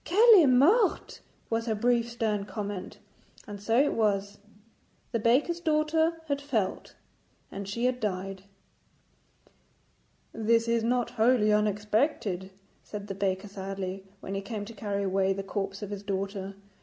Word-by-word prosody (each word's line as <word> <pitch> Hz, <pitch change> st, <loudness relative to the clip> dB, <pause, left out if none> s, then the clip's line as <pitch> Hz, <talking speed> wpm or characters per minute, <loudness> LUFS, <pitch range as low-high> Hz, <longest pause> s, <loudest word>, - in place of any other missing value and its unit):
'Qu'elle 425 Hz, +2 st, +7 dB
est 300 Hz, -, +5 dB
morte,' 350 Hz, -, +3 dB, 0.3 s
was 230 Hz, +1 st, -1 dB
her 220 Hz, -, +1 dB
brief 235 Hz, +1 st, +1 dB
stern 220 Hz, -3 st, -1 dB
comment. 200 Hz, -1 st, -6 dB, 0.5 s
And 205 Hz, -1 st, -8 dB
so 225 Hz, +3 st, +1 dB
it 290 Hz, -, +3 dB
was. 205 Hz, -2 st, 0 dB, 0.7 s
The 230 Hz, -, 0 dB
baker's 265 Hz, +10 st, +2 dB
daughter 320 Hz, 0 st, +1 dB
had 285 Hz, -1 st, -1 dB
felt, 225 Hz, -10 st, -2 dB, 0.6 s
and 200 Hz, 0 st, -6 dB
she 235 Hz, +4 st, -2 dB
had 250 Hz, 0 st, +1 dB
died. 195 Hz, -2 st, -4 dB, 1.9 s
'This 230 Hz, +1 st, +2 dB
is 230 Hz, -1 st, +1 dB
not 245 Hz, +1 st, 0 dB
wholly 225 Hz, -2 st, +3 dB
unexpected,' 210 Hz, -, 0 dB, 0.3 s
said 205 Hz, -1 st, -8 dB
the -, -, -2 dB
baker 195 Hz, 0 st, -2 dB
sadly, 195 Hz, -1 st, -5 dB, 0.2 s
when 195 Hz, -, -6 dB
he 195 Hz, -, -2 dB
came 205 Hz, 0 st, -5 dB
to 230 Hz, -, -10 dB
carry 200 Hz, -1 st, -3 dB
away 195 Hz, 0 st, +1 dB
the 195 Hz, 0 st, -5 dB
corpse 195 Hz, 0 st, -4 dB
of 205 Hz, -, -6 dB
his 200 Hz, -1 st, -5 dB
daughter. 195 Hz, 0 st, -4 dB
210 Hz, 145 wpm, -28 LUFS, 195-245 Hz, 1.9 s, Qu'elle